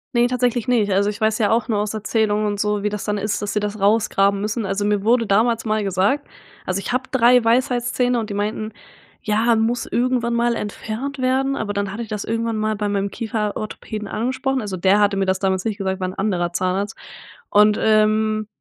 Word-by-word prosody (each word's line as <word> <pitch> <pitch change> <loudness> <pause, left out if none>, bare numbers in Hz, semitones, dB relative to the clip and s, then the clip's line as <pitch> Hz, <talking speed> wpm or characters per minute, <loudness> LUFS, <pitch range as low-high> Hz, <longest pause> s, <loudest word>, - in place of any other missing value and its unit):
Ne, 240 0 +4
tatsächlich 245 -2 0
nicht. 225 -5 +2
Also, 200 +2 +2
ich 210 +1 -6
weiß 220 0 +2
ja 210 -2 +1
auch 235 +2 +1
nur 210 - +1
aus 210 +1 -2
Erzählungen 215 0 0
und 205 -1 -2
so, 210 0 0
wie 210 - +1
das 210 -1 -5
dann 210 -1 -1
ist, 205 +1 -2
dass 205 0 -3
sie 210 - 0
das 210 +1 -3
rausgraben 200 -1 +2
müssen. 215 +1 -2
Also, 195 +1 -1
mir 205 -1 +1
wurde 230 +2 +3
damals 225 +3 +2
mal 215 -1 0
gesagt 200 +9 0 0.4
also, 185 +1 -1
ich 195 - -4
habe 255 +1 0
3 250 -1 +5
Weisheitszähne 245 0 +1
und 220 - -4
die 205 - -4
meinten: 215 +1 -3 0.5
„Ja, 225 +2 +2
muss 225 +2 0
irgendwann 240 -1 0
mal 235 0 +1
entfernt 230 +7 -5
werden." 265 +2 +1
Aber 215 -5 -3
dann 200 -1 -2
hatte 230 +3 -4
ich 220 - -11
das 210 -1 -4
irgendwann 230 0 -1
mal 215 0 0
bei 205 0 -2
meinem 200 0 -1
Kieferorthopäden 215 -1 -4
angesprochen. 260 +4 -1
Also, 205 -4 -4
der 190 +3 +3
hatte 205 -1 +3
mir 195 0 0
das 190 0 0
damals 190 -1 0
nicht 215 -2 -2
gesagt, 190 -2 -3
war 185 - 0
'n - - -7
anderer 180 -4 -1
Zahnarzt. 190 +5 -2 0.5
Und, 210 0 +5
ähm, 215 0 +2
215 Hz, 215 wpm, -21 LUFS, 205-235 Hz, 0.5 s, 3